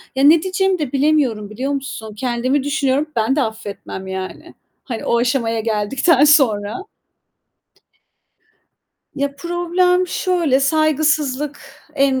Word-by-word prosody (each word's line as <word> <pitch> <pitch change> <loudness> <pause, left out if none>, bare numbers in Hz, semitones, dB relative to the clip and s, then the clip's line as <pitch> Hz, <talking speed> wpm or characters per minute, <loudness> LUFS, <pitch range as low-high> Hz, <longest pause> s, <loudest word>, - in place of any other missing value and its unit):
Ya 265 - +1
ne 310 +3 +6
diyeceğimi 380 0 0
de 295 -5 -3
bilemiyorum, 270 -8 +1
biliyor 260 +6 -3
musun? 225 -6 -6
Kendimi 255 +3 -1
düşünüyorum, 290 0 0
ben 230 +4 +1
de 295 - +1
affetmem 210 -4 -6
yani, 190 0 -7 0.3
hani 235 -4 -6
o 235 - +2
aşamaya 235 -2 0
geldikten 230 - +2
sonra. 230 -9 +3 2.4
Ya 280 0 -1
problem 350 +2 +1
şöyle, 340 -8 +1
saygısızlık 300 -1 +1 0.3
en 275 -2 +2
275 Hz, 115 wpm, -19 LUFS, 235-310 Hz, 2.4 s, ne